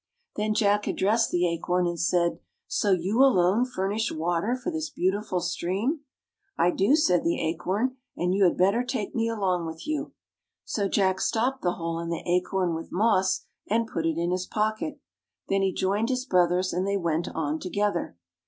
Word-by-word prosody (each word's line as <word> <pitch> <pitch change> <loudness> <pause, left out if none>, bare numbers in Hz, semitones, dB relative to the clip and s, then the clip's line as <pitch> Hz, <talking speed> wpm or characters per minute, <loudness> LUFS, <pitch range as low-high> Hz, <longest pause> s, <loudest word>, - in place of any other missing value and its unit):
Then 215 0 0
J 215 - +2
ack 205 +1 +2
addressed 220 +4 +2
the 175 0 +2
Acorn 175 +2 0
and 175 -1 -2
said, 170 +1 +1 0.2
" - - -52
So 205 - 0
you 190 +6 +2
alone 215 -3 +4
furnish 215 -2 -2
water 175 +8 0
for 255 +8 -4
this 315 -1 -3
beau 185 +1 +1
tiful 205 -3 -2
stream! 185 - -1 0.2
" - - -65
" 395 - -46
I 175 - +3
do,'' 200 +12 +3
said 180 - +3
the 170 - 0
Acorn, 190 +10 -1
" - - -41
and 180 +1 0
you 195 0 +4
had 175 - +2
better 200 +7 +3
take 245 -5 -3
me 230 -1 0
along 185 -6 0
with 160 0 -8
you." 305 -1 -3 0.5
So 200 -2 -1
J 200 - +2
ack 190 0 +1
stopped 255 +4 0
the 175 -1 +1
hole 165 -1 -3
in 170 0 -4
the 170 - -3
acorn 180 0 +1
with 165 0 -6
moss, 190 -2 +2 0.2
and 230 +2 +2
put 165 -7 -2
it 165 -1 -1
in 170 +1 0
his 185 0 -2
pocket. 215 +8 -2 0.5
Then 195 0 +2
he 195 -1 +2
joined 200 +5 0
his 255 -1 -1
brothers 180 -3 +2
and 185 +2 -1
they 200 0 +1
went 170 -2 -1
on 155 -1 -1
together. 185 - -2
190 Hz, 205 wpm, -26 LUFS, 175-220 Hz, 0.5 s, alone